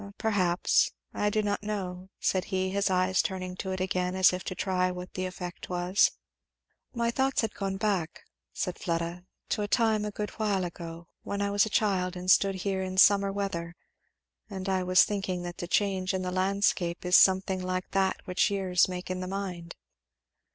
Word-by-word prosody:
"Perhaps 185 -5 +2 0.2
I 210 - +1
do 215 +1 0
not 205 0 -1
know," 190 -3 -5
said 185 -1 0
he, 190 -1 -1
his 200 +1 +1
eyes 185 0 +2
turning 185 -1 -4
to 190 - -4
it 185 - -3
again 185 -1 -1
as 185 -1 +5
if 180 - -4
to 185 - -4
try 185 -1 0
what 180 0 -7
the 185 0 -2
effect 180 -1 -7
was. 180 +2 +3 0.8
"My 235 -1 0
thoughts 265 +2 +1
had 225 -2 -2
gone 195 -1 -3
back," 195 -6 -1 0.3
said 180 - -3
Fleda, 170 +1 -3 0.2
"to - - 0
a 205 - -1
time 220 -1 +2
a 210 - -2
good 210 0 -4
while 205 -3 +1
ago, 170 -1 -8 0.2
when 200 - -4
I 200 0 0
was 205 +1 +3
a - - -5
child 190 -4 +1
and 180 +1 +1
stood 195 0 +4
here 190 -1 0
in 185 0 -4
summer 200 0 +6
weather 175 -4 -3 0.7
and 190 -1 -6
I 190 -1 +1
was 185 0 +5
thinking 195 -3 -2
that 175 0 -6
the 175 - -5
change 190 0 +1
in 185 - -2
the 180 - -2
landscape 185 -2 0
is 180 0 +4
something 190 0 +5
like 185 0 -3
that 190 -1 +1
which 180 +3 +2
years 190 -3 +2
make 180 0 -5
in 185 - -3
the 185 - -4
mind." 180 -3 -5
185 Hz, 195 wpm, -28 LUFS, 180-200 Hz, 0.8 s, summer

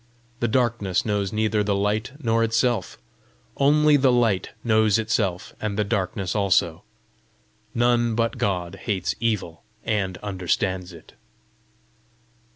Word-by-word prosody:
The 120 - +1
darkness 115 -6 0
knows 100 -3 -1
neither 110 -1 +1
the 100 -1 0
light 105 +5 -1
nor 115 -4 +1
itself; 115 -3 0 0.6
only 150 +1 +4
the 130 -2 +4
light 115 -6 +1
knows 110 -3 +3
itself 110 -5 -1
and 105 -2 -2
the 105 - +2
darkness 95 -2 -2
also. 95 -4 +2 0.9
None 120 -1 +2
but 115 0 -1
God 90 -3 -1
hates 95 -4 0
evil 105 -8 -2 0.2
and 95 -4 -1
understands 95 -1 -2
it. 85 -2 -15
105 Hz, 120 wpm, -24 LUFS, 95-115 Hz, 0.9 s, only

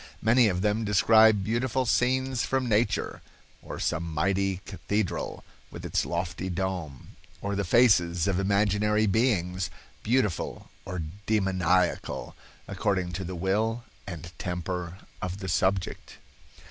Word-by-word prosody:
Many 115 +2 +5
of 90 -2 -1
them 105 +2 +1
describe 110 0 +5
beautiful 120 +4 0
scenes 130 +1 +1
from 130 -1 0
nature, 110 -1 0 0.4
or - - -7
some 80 - -1
mighty 95 +4 0
cathedral 105 0 -3 0.3
with - - -9
its - - 0
lofty 90 +2 -3
dome, 90 -7 -4 0.3
or 100 0 -3
the 100 - 0
faces 90 -4 +4
of 95 -2 +1
imaginary 105 +2 +2
beings, 95 -5 +1 0.3
beautiful 110 -7 -1
or 90 -3 -4 0.2
demoniacal, 95 - +1 0.3
according 95 -3 -1
to 95 +2 -4
the 90 0 -5
will 110 +6 0 0.2
and 85 -2 -7
temper 90 0 -4 0.2
of 90 0 -3
the 95 -1 -6
subject." 95 +2 -1
95 Hz, 120 wpm, -27 LUFS, 90-110 Hz, 0.4 s, Many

